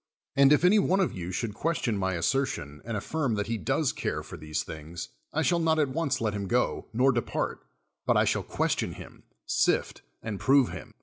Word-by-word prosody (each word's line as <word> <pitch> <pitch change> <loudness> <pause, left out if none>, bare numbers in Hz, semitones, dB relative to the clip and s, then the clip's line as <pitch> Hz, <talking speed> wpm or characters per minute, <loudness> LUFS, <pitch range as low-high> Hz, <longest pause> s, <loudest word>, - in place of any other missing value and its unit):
" - - -66
And 140 0 +6
if 150 +4 +5
any 205 +4 +6
one 190 0 +2
of 190 - +1
you 90 -1 -5
should 105 +3 -2
question 125 -4 -1
my 95 -2 0
assertion 85 - -1
and 115 0 -3
affii 155 +8 -2
m 120 - +1
that 105 -1 -1
he 115 -1 -2
does 85 - +1
care - - -3
for - - -9
these 75 0 -3
things, 80 +2 -7 0.2
I 160 - 0
shall 175 +1 +2
not 160 -1 +2
at 150 -3 +2
once 155 +1 -1
let 110 -2 0
him 100 -1 -3
go, 125 +5 0
nor 130 +4 +4
depart, 120 -3 -2 0.5
but - - +4
I - - +4
shall - - +1
question - - -1
him, - - -12 0.2
sift - - +1 0.2
and 110 -3 -4
prove 135 -2 +4
him. - - -9
115 Hz, 220 wpm, -28 LUFS, 95-150 Hz, 0.5 s, And